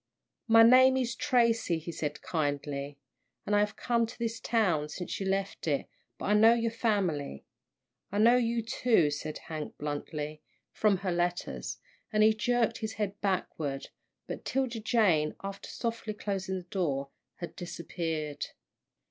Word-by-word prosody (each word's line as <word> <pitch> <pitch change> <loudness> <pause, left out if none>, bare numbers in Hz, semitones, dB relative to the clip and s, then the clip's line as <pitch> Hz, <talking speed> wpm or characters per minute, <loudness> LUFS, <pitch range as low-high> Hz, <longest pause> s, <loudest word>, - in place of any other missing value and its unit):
"My 225 0 +8
name 260 +2 +7
is 245 -2 0
Tracy," 235 - +2
he 160 +2 -6
said, 150 -2 -4
kindly, 145 -2 -2 0.5
"and 205 - +1
I - - +5
have 210 0 +1
come 235 -2 +1
to - - -11
this 230 -1 -2
town 175 -12 +1
since 175 +3 -5
you 195 - -2
left 195 -2 -2
it, 145 -3 0 0.3
but - - -6
I 205 - +3
know 220 +2 +7
your 230 -1 0
family." 185 - -1 0.7
"I 200 - -2
know 230 +3 +6
you, 235 -1 +1
too," 225 - +3
said 150 +1 -4
Hank, 155 -2 -7
bluntly, 150 +1 -4 0.3
"from 210 -3 +2
her 185 - +1
letters," 175 0 -2 0.3
and 215 -1 +4
he 220 0 +6
jerked 230 +1 +1
his 220 -1 -3
head 205 -1 -3
backward, 155 -8 -2 0.4
but - - -6
'Tilda 260 -3 -1
Jane, 200 -10 +2
after 195 0 -6
softly 230 -2 -3
closing 190 -2 -3
the 180 - -6
door, 150 -7 -2 0.3
had 175 - -7
disappeared. 165 -3 -4
195 Hz, 155 wpm, -30 LUFS, 155-230 Hz, 0.7 s, My